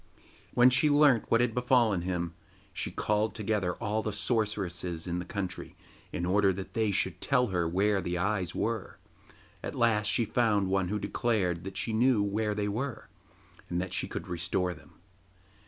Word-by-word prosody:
When 125 +1 +7
she 125 +4 +3
learnt 145 -5 +4
what 115 - +4
had 120 -2 +1
befallen 125 -6 +2
him 85 -1 -2 0.4
she - - -3
called 105 +1 0
together 105 -4 -1
all 110 -1 -1
the 110 - -3
sorceresses 100 -6 -1
in 90 -1 -2
the 90 - -5
country 100 -2 -5 0.4
in 85 - -2
order 100 +2 +3
that 95 +1 -7
they 110 -2 +1
should 100 - 0
tell 125 -4 +2
her 90 -3 0
where 100 +3 +2
the 90 0 -2
eyes 95 -1 -1
were. 115 -3 -2 0.6
At - - -5
last 105 -3 +2
she 110 +3 +3
found 105 -4 +1
one 95 -1 +1
who 105 +3 -1
declared 95 -7 -1
that 95 -1 -5
she 115 - -2
knew 115 -1 +3
where 105 +1 -1
they 105 0 -1
were, 120 +5 -4 0.6
and 85 - -1
that 90 0 -4
she - - -1
could - - -6
restore 90 +1 -1
them. - - -17
105 Hz, 175 wpm, -29 LUFS, 90-115 Hz, 0.6 s, When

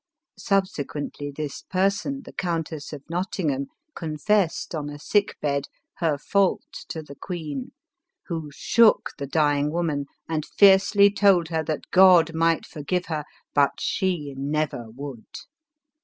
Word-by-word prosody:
Subsequently 150 -8 -2
this 145 -1 -5
person, 200 +9 -1
the - - -12
Countess 165 -4 -3
of 145 -3 -8
Not 175 +3 -2
tingham, 140 -6 -1 0.3
confessed, 165 +4 0
on 150 -2 -3
a 145 - -7
sick 205 +7 0
bed, 140 -1 -1 0.3
her 160 -4 +1
fault 195 +6 +1 0.2
to 160 - -5
the 140 - -11
queen, 150 -4 -6 0.5
who 160 -3 -4
shook 230 - +3
the 140 - -4
dying 145 -1 +2
woman, 155 -4 -1 0.2
and 155 -2 -1
fiercely 200 +2 +5
told 195 -5 +3
her 160 -1 -1
that 155 -1 -4
God 180 -3 +6
might 165 0 +2
forgive 175 +5 -3
her, 155 -2 -2 0.3
but 140 -1 +4
she 170 -7 -1
never 140 -4 -2
would. 130 0 -9
160 Hz, 135 wpm, -24 LUFS, 145-185 Hz, 0.5 s, God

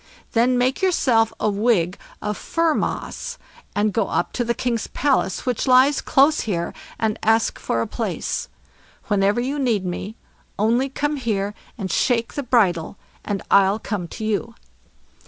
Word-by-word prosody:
Then 245 +2 +3
make 255 +5 +1
yourself 245 - +3
a - - +1
wig 200 -4 +2 0.3
of 210 0 -1
fir 330 +6 0
moss, - - -3 0.4
and 205 0 +1
go 220 -1 +1
up - - -1
to 240 - 0
the 235 0 -1
king's 235 -1 -1
palace, 270 -8 0
which 250 0 -1
lies 260 +3 +5
close 285 +3 +4
here, 170 -5 -2 0.3
and 220 -1 0
ask 225 +1 +2
for 115 - -1
a - - 0
place. - - -3 0.6
Whenever 200 +2 +2
you 270 +4 -2
need 230 -8 +1
me, 185 +4 -4 0.4
only 235 +6 +2
come 295 +2 -1
here 210 -5 -1 0.2
and 195 -4 -4
shake 235 -2 +1
the 285 - -2
bridle, 200 - +1 0.3
and 200 -2 -3
I'll 200 +1 +5
come 205 -5 -4
to 215 - -6
you." 210 -5 -2
225 Hz, 155 wpm, -22 LUFS, 200-255 Hz, 0.6 s, lies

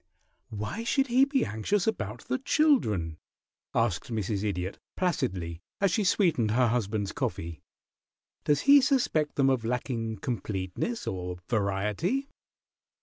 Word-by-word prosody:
"Why 110 - -4
should 270 +3 +2
he 255 +3 +5
be 275 -2 +1
anxious 110 - 0
about 220 - -2
the 260 - 0
children?" 110 - +2 0.6
asked - - 0
Mrs. 105 -2 -1
Idiot, 95 -2 -2 0.2
placidly, 90 - -1 0.2
as 195 -2 +3
she 210 +4 +1
sweetened 170 - +2
her 120 +2 +3
husband's 110 -3 -1
coffee. 80 -3 -4 0.8
"Does 145 -1 +2
he 280 0 +7
suspect 250 - +1
them 135 -1 +4
of 130 -3 0
lacking 115 -2 -2
completeness 100 - -3
or 90 -1 -4
variety?" 105 - 0
115 Hz, 125 wpm, -28 LUFS, -, 0.8 s, he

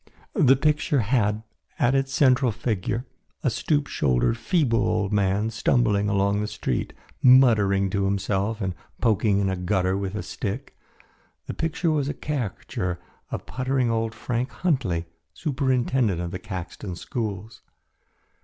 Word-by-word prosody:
The 140 - +5
picture 150 -1 +1
had, 105 -2 +1 0.3
as 120 +2 +3
its 135 0 +1
central 130 -2 +4
figure, 115 +1 -2 0.4
a 130 - +2
stoop 145 +5 0
shouldered, 65 - +1
feeble 115 0 +1
old 105 -1 0
man 100 +2 +1
stumbling 110 -2 +2
along 100 0 +1
the 105 - -2
street, 105 - -2 0.3
muttering 110 -7 +5
to 100 -1 0
himself 100 +2 -1
and 95 -2 -1 0.3
poking 110 -3 +2
in 100 -1 +1
a 95 - 0
gutter 95 0 0
with 100 0 -3
a 105 - -3
stick. 105 +8 -5 0.7
The - - -5
picture 165 +1 -1
was 145 -2 0
a - - -3
caricature 100 - -3 0.3
of - - -5
puttering 130 -1 0
old 115 -1 -1
Frank 120 +3 -2
Huntley, 125 - -1 0.3
superintendent 130 - 0
of 85 -1 -3
the 95 - -5
Caxton 95 -2 -6
schools. 105 +2 -5
110 Hz, 140 wpm, -25 LUFS, 100-130 Hz, 0.7 s, The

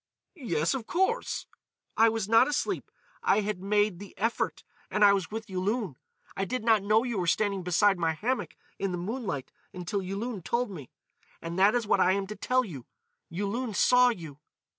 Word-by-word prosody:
"Yes, 170 - -1
of 255 -4 -4
course——" 380 +7 0 0.5
"I 225 +1 +6
was 220 -3 -2
not 225 +4 +6
asleep. 295 - -2 0.3
I 210 - +3
had 205 -3 -3
made 205 -2 +1
the 200 -1 -11
effort 225 +3 -1 0.3
and 210 0 +4
I 200 - +7
was 195 -4 -1
with 220 +1 -5
Yulun.... 195 - -2 0.4
I 195 - -1
did 250 +4 -3
not 220 -2 +4
know 215 +3 +3
you 240 -5 -2
were 175 - -1
standing 200 +2 +1
beside 180 +2 +3
my 165 -1 +1
hammock 245 +11 -2 0.2
in 195 -2 -1
the - - -2
moonlight 195 - -4 0.2
until 185 +3 -3
Yulun 200 +3 -4
told 235 +6 -1
me.... 150 -9 -9 0.5
And 170 +2 -5
that 200 +4 +5
is 240 -2 0
what 200 - +2
I 185 0 +4
am 200 0 -1
to 210 +2 -7
tell 255 +2 +1
you; 140 - -9 0.4
Yulun 205 +6 -3
saw 250 +3 +5
you.... 160 - -6
205 Hz, 185 wpm, -28 LUFS, 185-230 Hz, 0.5 s, I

